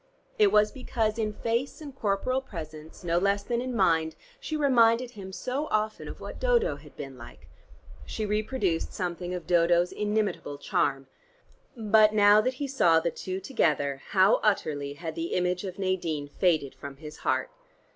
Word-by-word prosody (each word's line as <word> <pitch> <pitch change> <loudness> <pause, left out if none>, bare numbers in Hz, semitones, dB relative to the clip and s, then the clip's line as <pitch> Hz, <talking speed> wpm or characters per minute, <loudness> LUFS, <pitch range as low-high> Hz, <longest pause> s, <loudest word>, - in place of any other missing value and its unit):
It 205 -2 +5
was 210 0 +4
because 230 -4 -2
in 215 -1 0
face 235 +5 -2
and 290 -4 -9
corporal 240 +4 0
presence 160 -9 -9
no 170 0 +1
less 200 +2 +1
than 235 +2 -1
in 255 -1 -4
mind 165 -6 +2 0.2
she 315 -10 -3
reminded 245 -4 +3
him 195 -4 -9
so 260 +9 -3
often 215 0 -1
of - - -8
what - - -8
Dodo - - +2
had - - -16
been - - -8
like. - - -13 0.6
She 215 - -4
reproduced 210 -4 -1
something 175 -1 -3
of 175 - -6
Dodo's 175 0 +3
inimitable 210 -8 -2
charm: 135 -1 0 0.7
But 215 -1 +4
now 205 0 +6
that 255 +4 -1
he 280 +2 -3
saw 175 -12 +4
the 170 +1 -1
two 185 +3 -5
together 145 - 0
how 190 +1 +4
utterly 145 -9 0
had 160 +2 -6
the 165 +1 -4
image 180 +1 0
of 185 -2 -6
Nadine 175 -6 -2
faded 155 -5 +1
from 135 +1 -9
his 150 0 -10
heart. - - -1
200 Hz, 165 wpm, -27 LUFS, 165-225 Hz, 0.7 s, now